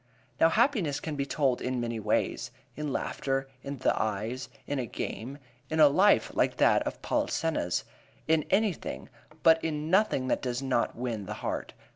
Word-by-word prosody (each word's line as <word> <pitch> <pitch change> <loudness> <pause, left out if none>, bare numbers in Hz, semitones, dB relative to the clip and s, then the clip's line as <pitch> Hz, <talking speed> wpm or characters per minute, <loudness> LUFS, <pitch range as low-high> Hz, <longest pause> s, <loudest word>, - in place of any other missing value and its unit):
Now 165 - +6
happiness 215 - +2
can 155 -2 -4
be 140 -1 -2
told 135 -4 +1
in 125 0 -1
many 115 -1 -2
ways: 105 0 0 0.3
in 150 -1 -3
laughter, 135 0 -2
in 140 0 -5
the 130 - +2
eyes, 110 +5 -2 0.2
in 145 -1 -2
a 125 - -2
game, 130 +6 -5 0.3
in 160 - -1
a 150 - +9
life 195 +8 +4
like - - +1
that - - +4
of - - -6
Polissena's, 155 - 0 0.4
in 160 -1 +3
anything, 200 -2 0 0.3
but 165 0 +6
in 155 0 -2
nothing 190 -10 +3
that - - +1
does 125 -1 -2
not 130 -3 0
win 115 -5 -4
the 105 - -4
heart. - - -3
140 Hz, 170 wpm, -29 LUFS, 125-160 Hz, 0.4 s, a